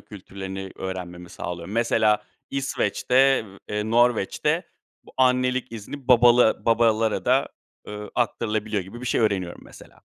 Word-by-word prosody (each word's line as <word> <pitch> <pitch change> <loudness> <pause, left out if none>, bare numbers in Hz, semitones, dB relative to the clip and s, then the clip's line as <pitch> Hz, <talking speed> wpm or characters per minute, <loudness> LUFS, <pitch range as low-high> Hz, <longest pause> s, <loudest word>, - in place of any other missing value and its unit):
kültürlerini 95 -1 -8
öğrenmemi 90 -2 -6
sağlıyor. 85 0 -6
Mesela, 110 -1 +2 0.3
İsveç'te, 135 -1 +1 0.2
eee, 105 +1 -2
Norveç'te 120 -3 +1 0.4
bu - - -16
annelik 125 -1 +1
izni, 125 +5 -8
babala 120 -1 +5
babalara 115 -1 +2
da, - - +2 0.4
ııı, 105 0 -7
aktarılabiliyor 110 -4 -1
gibi 105 +6 -11
bir 125 - -6
şey - - +1
öğreniyorum, 95 -5 -1
mesela. - - -16
110 Hz, 120 wpm, -24 LUFS, 95-125 Hz, 0.4 s, babala